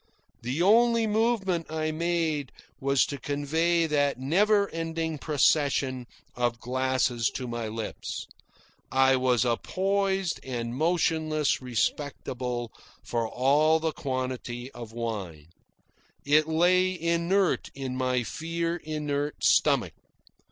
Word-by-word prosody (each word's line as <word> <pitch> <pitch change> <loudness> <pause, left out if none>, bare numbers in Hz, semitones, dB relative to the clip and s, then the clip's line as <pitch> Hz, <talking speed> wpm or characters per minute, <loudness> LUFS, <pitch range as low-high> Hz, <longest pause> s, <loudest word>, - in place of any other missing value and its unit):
The 130 +8 -1
only 230 +3 +4
movement 210 -6 0
I 155 0 -1
made 160 -4 -1 0.3
was 140 0 +3
to 140 - -6
convey 160 +5 +1
that 145 -3 +1
never 200 +10 +3
ending 165 -1 -3
procession 140 -4 +1 0.3
of 120 -1 -1
glasses 130 -2 0
to 125 - -4
my 120 -1 -4
lips. 110 0 -5 0.7
I 135 0 +4
was 125 -2 +2
a 120 -1 +2
poised 195 -1 -1
and 120 -2 -4
motionless 155 -2 +1
receptacle 125 -1 -2 0.3
for 115 -1 -1
all 150 +6 +3
that 160 -1 -1
quantity 130 -2 -4
of 120 -2 -9
wine. 100 -10 -5 0.8
It 150 +2 +4
lay 180 +3 +2
inert 170 +3 +1
in 135 -2 -4
my 130 -1 0
fear 165 +6 -3
inert 150 -2 -3
stomach. - - +3
145 Hz, 110 wpm, -27 LUFS, 125-170 Hz, 0.8 s, only